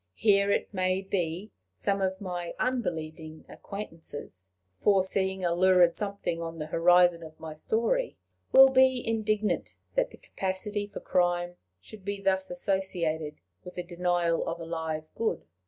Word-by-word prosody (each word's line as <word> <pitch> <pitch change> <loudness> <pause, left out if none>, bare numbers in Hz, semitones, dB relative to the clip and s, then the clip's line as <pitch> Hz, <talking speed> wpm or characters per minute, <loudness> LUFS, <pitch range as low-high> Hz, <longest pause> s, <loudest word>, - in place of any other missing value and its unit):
Here, 200 -2 +4
it 200 - 0
may 185 0 +1
be, 185 +1 -2 0.2
some 200 -1 -1
of 190 0 0
my 175 -3 -4
unbelieving 160 -10 -3
acquaintances, 160 - -8 0.3
foreseeing 190 - +2
a 170 - +2
lurid 180 -1 +5
something 200 -5 -3
on 165 0 -5
the 155 - -4
horizon 175 +2 +4
of 155 -1 -11
my 160 -1 -7
story, 235 - 0 0.3
will 270 0 +9
be 260 -2 +4
indignant 215 -1 0 0.2
that - - +1
the - - -14
capacity 205 +2 -3
for - - -8
crime 175 0 +1 0.2
should 200 - -13
be 200 +1 -3
thus 190 -1 +1
associated 175 -5 -1 0.3
with 180 - -10
the 180 - -3
denial 175 -1 0
of 170 +1 -3
a 165 - -6
Live 160 -1 -3
Good. 230 - -2
185 Hz, 145 wpm, -28 LUFS, 170-200 Hz, 0.3 s, will